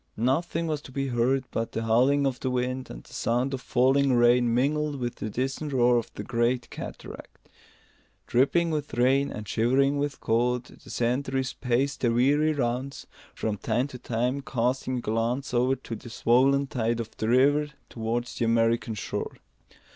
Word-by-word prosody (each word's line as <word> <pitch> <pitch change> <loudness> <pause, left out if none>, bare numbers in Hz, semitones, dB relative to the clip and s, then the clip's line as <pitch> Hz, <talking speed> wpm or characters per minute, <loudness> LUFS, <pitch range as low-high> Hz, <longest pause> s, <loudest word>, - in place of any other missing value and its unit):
Nothing 160 +8 0
was 155 -2 -2
to 135 - -12
be 135 +1 -2
heard 125 +2 +1
but 115 0 -3
the 115 - -2
howling 130 +6 +3
of 130 -2 -1
the 130 - -2
wind 125 0 -2
and - - -9
the - - -17
sound 125 +4 0
of 130 - -3
falling 135 +2 +3
rain 120 0 +4
mingled 145 +4 +1
with 120 -1 -3
the 110 - -4
distant 135 +6 -3
roar 120 -1 +4
of 115 - -3
the - - -5
great 120 +1 0
cataract. - - -9 0.8
Dripping 165 +7 +2
with 150 -5 -3
rain 135 +3 +3
and 105 -1 -7
shivering 135 +7 +2
with 145 -1 -2
cold, 120 +2 +1
the - - -16
sentries 130 +2 -1
paced 130 +2 -1
their 120 -2 +2
weary 145 +6 +3
rounds, 130 -1 -2 0.3
from 105 -2 -2
time 120 +5 0
to 125 - -9
time 125 +5 -1
casting 130 0 -1
a - - -3
glance 120 +5 -1
over 125 +2 +2
the 120 -2 -8
swollen 130 +5 +3
tide 120 -3 -1
of 115 -1 -6
the 110 - -1
river 145 +4 +4 0.2
towards 120 +1 -3
the 115 - +2
American 115 0 +1
shore. 100 - -4
125 Hz, 170 wpm, -27 LUFS, 120-135 Hz, 0.8 s, rain